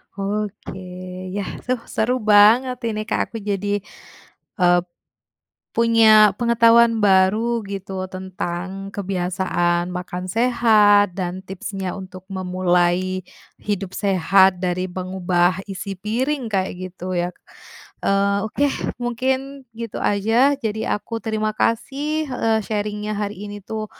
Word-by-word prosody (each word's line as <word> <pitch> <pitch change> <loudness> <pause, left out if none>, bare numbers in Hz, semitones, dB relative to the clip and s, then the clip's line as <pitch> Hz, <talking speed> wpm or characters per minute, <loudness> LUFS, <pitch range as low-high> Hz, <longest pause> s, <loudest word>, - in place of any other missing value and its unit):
Oke 205 0 -4 0.6
yah, 200 -2 -4
suh 250 -1 0
seru 235 +3 0
banget 220 +5 +5
ini 215 -1 -2
Kak, - - 0
aku 230 - -5
jadi, 205 0 -1 0.7
eee, 175 -2 +4 0.9
punya 220 -3 +5
pengetahuan 235 0 +4
baru 210 +4 +3
gitu 195 -1 -5
tentang 185 +1 -5
kebiasaan 180 -2 -1
makan 180 0 -5
sehat, 210 -3 +4
dan 185 -1 -3
tipsnya 190 0 -5
untuk 185 -1 -10
memulai 185 -1 0 0.3
hidup 195 -2 -4
sehat, 190 -1 +3
dari 180 0 -1
mengubah 185 0 0
isi 195 0 -6
piring 235 +6 -2
kayak 190 -2 0 0.2
gitu 185 +1 -5
ya. 175 0 -1 0.7
Eee, 200 0 +2
oke 285 +6 0 0.4
mungkin 260 +3 -2
gitu 230 -1 -6
aja 225 +8 +3
jadi 220 -4 -2
aku 230 +2 -6
terima 215 -1 -1
kasih, 285 +8 -1
eee, 225 -3 +1
sharing-nya 210 0 -3
hari 205 0 -4
ini 205 0 -7
tuh 215 +1 -4
205 Hz, 115 wpm, -21 LUFS, 185-225 Hz, 0.9 s, banget